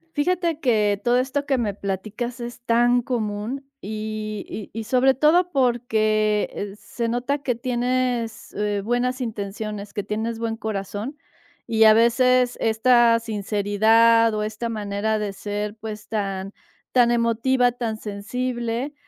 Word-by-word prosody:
Fíjate 335 +1 0
que 210 -6 +2
todo 245 +1 +3
esto 275 +3 -1
que 270 -2 +2
me 215 -4 -1
platicas 215 +6 -4
es 240 0 -7
tan 240 +1 +3
común, 230 +2 -3 0.2
y 215 0 -5
y 210 - -7
y - - -3
sobre 255 +3 +3
todo 340 +6 +3
porque 215 -5 +1
se 235 -1 -4
nota 250 +4 -1
que 255 -3 -1
tienes, 245 -1 -1
eh, 205 -1 -1
buenas 250 +2 0
intenciones, 210 -2 -5
que 205 -2 -3
tienes 220 +3 -3
buen 225 -1 -2
corazón. 215 +5 -4 0.5
Y 225 -1 +4
a 215 - +8
veces 250 +2 +3
esta 230 +1 +4
sinceridad 220 +2 +3
o 210 - -1
esta 220 +2 -4
manera 210 0 -1
de 205 -2 -3
ser, 205 +1 -4
pues, 215 -1 -7
tan 195 -2 -3 0.4
tan 245 -2 +4
emotiva, 240 +2 +2
tan 230 -3 -3
sensible, 235 +5 -3
230 Hz, 135 wpm, -23 LUFS, 210-245 Hz, 0.5 s, a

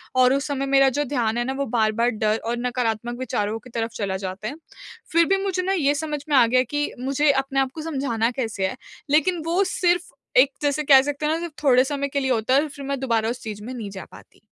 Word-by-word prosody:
और 255 0 +5
उस 275 +2 -1
समय 275 -1 -2
मेरा 275 0 +4
जो - - +2
ध्यान 240 -4 -1
है 240 - +1
ना 265 - -2
वो 280 +1 -2
बार-बार 230 0 +1
डर 215 0 0
और 235 +1 -1
नकारात्मक 240 -1 -2
विचारों 220 -3 -2
की 240 - -15
तरफ़ 230 -1 -3
चला 195 -2 -2
जाता 190 +2 -5
है। 280 - -5 0.6
फ़िर 335 +1 +4
भी 390 +3 +2
मुझे 375 -2 -1
ना 385 +1 0
ये 290 -5 +2
समझ 295 -1 -3
में 290 - +3
आ 245 - +7
गया 255 +2 +3
कि 290 +4 -2
मुझे 275 +3 +2
अपने 270 0 0
आपको 270 +4 -1
समझाना 265 -7 -1
कैसे 225 -7 -2
है? - - -5 0.3
लेकिन 325 +3 +2
वो 345 +4 +2
सिर्फ़ 355 -2 0 0.3
एक 270 +2 +6
जैसे 290 +1 0
कह 275 -2 +7
सकते 290 +2 -3
हैं 305 - +2
ना 325 - -1
सिर्फ़ 340 -3 -6
थोड़े 255 -3 +5
समय 280 +1 -2
के 280 - -1
लिए 265 -1 -1
होता 230 +2 +1
है 280 - +5
और 310 - -3
फ़िर 280 -1 -9
मैं 275 -1 -2
दुबारा 230 -4 0
उस 245 - -5
चीज़ 210 -2 -6
में 250 +4 -6
नहीं 225 -5 -6
जा 190 -1 -8
पाती। - - -16
265 Hz, 250 wpm, -23 LUFS, 230-290 Hz, 0.6 s, आ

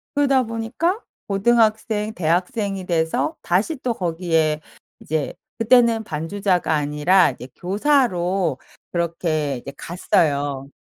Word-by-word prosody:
그러다 275 -3 +3
보니까 230 - -2 0.3
고등학생, 215 0 +2
대학생이 185 +3 -1
돼서 165 - 0
다시 195 - +1
또 250 -2 -1
거기에 165 -4 0 0.4
이제 155 -2 -2 0.3
그때는 230 -1 +4
반주자가 180 +2 -1
아니라 150 +3 +3
이제 125 - -10
교사로 190 - +1 0.3
그렇게 165 -4 -1
이제 135 +3 -9
갔어요. 145 -5 0
180 Hz, 260 characters per minute, -22 LUFS, 160-225 Hz, 0.4 s, 그때는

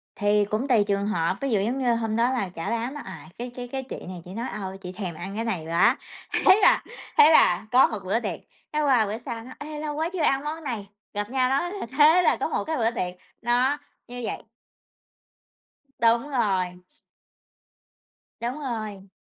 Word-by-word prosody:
Thì 205 -1 +2
cũng 215 +7 -2
tùy 235 -5 +4
trường 200 0 0
hợp, 175 -2 0
ví 275 - -1
dụ 210 - +3
giống 235 +6 -1
như 240 -2 +2
hôm 225 -1 -1
đó 240 +2 +3
là 220 -8 -1
cả 175 +2 -5
đám 235 +4 -2
là, 295 - -6
à, - - -10
cái 245 +1 -5
cái 245 -1 -6
cái 265 +1 -4
chị 260 - -8
này 180 -2 -7
chỉ 180 - -9
nói: 235 +4 -3
"Ơ, 190 -2 -5
chị 180 - -6
thèm 180 -3 -5
ăn 190 +4 -6
cái 225 +2 -2
này 180 -8 -2
quá." 195 - +4 0.5
thế 380 +2 +8
là - - +5 0.3
thế 440 -8 +8
là 180 - +5
có 255 +2 +7
một 215 - -4
bữa 200 +5 +1
tiệc, 200 -8 -4 0.3
cái 305 - +1
qua 255 -6 +4
bữa 210 +2 -3
sau 235 -2 -6
nó 255 - -11
"Ê, 300 0 -6
lâu 300 -1 -3
quá 320 +2 -1
chưa 365 - -2
ăn 275 -1 +2
món 315 +2 -4
này." 230 -8 -4 0.3
gặp 205 +1 -3
nhau 255 -1 +2
nói 280 +7 0
th 395 - -6
thế 310 +4 +7
là - - +3
có - - -1
một - - -1
cái 315 0 -2
bữa 230 -2 +2
tiệc, 180 -6 -3 0.3
đó, 245 +4 +2 0.3
như 245 0 -7
vậy. - - -4 1.6
Đúng 235 +5 +3
rồi. 190 -8 0 1.6
Đúng 245 +5 -3
rồi. 215 -7 -5
235 Hz, 210 wpm, -25 LUFS, 200-270 Hz, 1.6 s, thế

